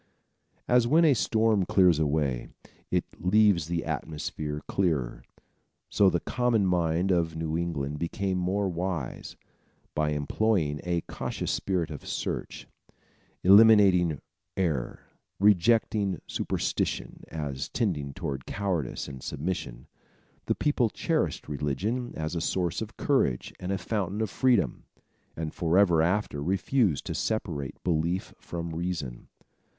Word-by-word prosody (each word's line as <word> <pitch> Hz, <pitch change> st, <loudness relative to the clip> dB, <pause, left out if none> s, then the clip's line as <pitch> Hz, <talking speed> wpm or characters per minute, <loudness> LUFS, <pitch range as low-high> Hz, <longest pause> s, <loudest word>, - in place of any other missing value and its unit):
As 125 Hz, -1 st, +4 dB
when 160 Hz, +6 st, +5 dB
a 150 Hz, -, +6 dB
storm 110 Hz, -4 st, +2 dB
clears 90 Hz, -3 st, +4 dB
away, 70 Hz, -5 st, 0 dB, 0.4 s
it -, -, +1 dB, 0.2 s
leaves 95 Hz, -3 st, +3 dB
the 85 Hz, 0 st, -2 dB
atmosphere 75 Hz, 0 st, -4 dB
clearer, 80 Hz, -11 st, 0 dB, 0.7 s
so 100 Hz, -2 st, +4 dB
the 85 Hz, -, 0 dB
common 120 Hz, -3 st, +1 dB
mind 90 Hz, 0 st, +1 dB
of 85 Hz, -2 st, +1 dB
New 80 Hz, -1 st, -2 dB
England 75 Hz, -4 st, -2 dB
became 95 Hz, +2 st, -1 dB
more 95 Hz, +3 st, 0 dB
wise. 90 Hz, -5 st, -4 dB, 0.6 s
By 75 Hz, 0 st, +1 dB
employing 75 Hz, +1 st, 0 dB
a 85 Hz, -1 st, 0 dB
cautious -, -, -4 dB
spirit 90 Hz, -5 st, -1 dB
of 75 Hz, -, -8 dB
search, -, -, -4 dB, 0.8 s
eliminating 95 Hz, -6 st, +6 dB, 0.4 s
error, 80 Hz, -10 st, -1 dB, 0.4 s
rejecting 105 Hz, -1 st, +3 dB
superstition -, -, -2 dB
as 70 Hz, -4 st, -4 dB
tending 80 Hz, -, -1 dB
toward 70 Hz, -8 st, -4 dB
cowardice 90 Hz, -10 st, -2 dB
and 65 Hz, -2 st, -8 dB
submission, 70 Hz, -5 st, -4 dB, 0.6 s
the -, -, +2 dB
people 135 Hz, -6 st, +1 dB
cherished -, -, -1 dB
religion 80 Hz, -, -2 dB
as 80 Hz, +1 st, -3 dB
a 85 Hz, -, -2 dB
source 90 Hz, +1 st, -1 dB
of 110 Hz, -1 st, -7 dB
courage 130 Hz, -, +1 dB
and 90 Hz, +1 st, -4 dB
a 95 Hz, -, 0 dB
fountain 100 Hz, +1 st, -2 dB
of 110 Hz, -4 st, -1 dB
freedom, 120 Hz, -, +1 dB, 0.5 s
and 80 Hz, -1 st, -4 dB
forever 85 Hz, 0 st, +3 dB
after 85 Hz, -3 st, 0 dB
refused 95 Hz, -, +1 dB
to -, -, -3 dB
separate 80 Hz, -, -3 dB
belief 85 Hz, +2 st, -1 dB
from 85 Hz, -1 st, -5 dB
reason. 80 Hz, -8 st, -4 dB
85 Hz, 125 wpm, -28 LUFS, 75-100 Hz, 0.8 s, a